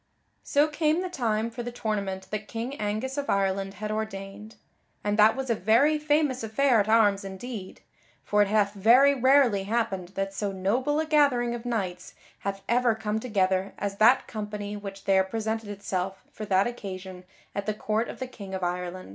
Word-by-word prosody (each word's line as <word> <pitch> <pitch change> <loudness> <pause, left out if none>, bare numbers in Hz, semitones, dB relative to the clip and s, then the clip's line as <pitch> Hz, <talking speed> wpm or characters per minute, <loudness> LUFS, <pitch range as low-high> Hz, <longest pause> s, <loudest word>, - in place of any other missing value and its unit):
_ - - -45 0.4
So 290 +2 +2
came 310 +3 +1
the 365 - -5
time 230 -6 -1
for 240 - -6
the 245 +1 -5
tournament 200 -5 -3
that 215 0 -4
King 230 +4 -4
Angus 220 +7 -2
of 285 - -4
Ireland 195 0 0
had 215 0 -4
ordained; 215 0 -5 0.5
and 205 0 0
that 215 +1 +6
was 265 -2 -2
a - - +5
very 230 - +3
famous 295 -4 +1
affair 235 +2 +3
at 205 +1 0
arms 205 -3 +4
indeed. 195 +1 -7 0.4
For 210 0 +2
it 205 - +4
hath 205 -1 +2
very 240 +8 +6
rarely 260 -6 +4
happened 205 -4 -1
that 195 0 -2
so 200 0 -2
noble 240 +11 0
a 315 - 0
gathering 280 -6 +3
of 240 0 -6
knights 185 -6 -3 0.2
hath 195 0 -4
ever 240 -1 +3
come 220 0 -2
together 190 -4 0
as 200 0 -3
that 230 +5 +5
company 210 -1 -5
which 195 -1 -8
there 190 -1 +4
presented 220 +2 -3
itself 195 -2 -4
for 215 - -7
that 195 -1 +3
occasion 190 -6 -6 0.3
at 200 0 -4
the 215 - +1
court 215 +2 -1
of - - -7
the 260 - -4
King 200 -6 -8
of 190 - -4
Ireland. 180 +1 -3
215 Hz, 190 wpm, -27 LUFS, 195-245 Hz, 0.5 s, that